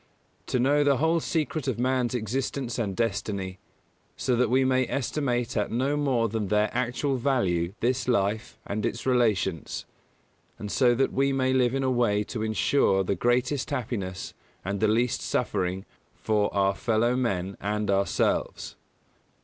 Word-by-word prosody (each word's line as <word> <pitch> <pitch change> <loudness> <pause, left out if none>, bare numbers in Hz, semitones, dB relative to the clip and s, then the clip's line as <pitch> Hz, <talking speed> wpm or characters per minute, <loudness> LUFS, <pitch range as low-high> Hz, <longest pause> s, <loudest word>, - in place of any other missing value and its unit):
To - - 0
know 145 +4 +3
the 140 -2 +3
whole 160 +4 +2
secret 155 -3 -2
of - - 0
man's 125 0 0
existence 125 +2 -2
and 100 -5 -2
destiny, 100 -3 -2 0.6
so 125 - +1
that 120 -1 +2
we 130 +2 +3
may 130 -1 +2
estimate 125 -3 -1
at 105 - 0
no 130 +5 0
more 135 -6 +1
than 110 -1 -2
their 105 +1 +2
actual 130 +2 -1
value 100 -9 0
this 125 +2 0
life 110 0 0
and 105 +1 -3
its 115 0 -2
relations; 110 - 0 0.7
and 105 -1 -6
so 125 -2 +3
that 135 +2 +1
we 140 +1 +2
may 130 -1 +1
live 125 -1 +2
in 135 - 0
a 130 - +1
way 110 -4 +2
to 110 +1 -5
ensure 110 -1 +2
the 95 - 0
greatest 125 +4 0
happiness 100 -6 -4 0.3
and 100 +1 -2
the 110 - +3
least 115 +2 +1
suffering 95 +1 -1 0.3
for 105 -2 0
our 100 0 +2
fellow 115 +3 +1
men 100 -7 -1
and 105 0 -1
ourselves. 100 0 0
120 Hz, 155 wpm, -27 LUFS, 105-130 Hz, 0.7 s, know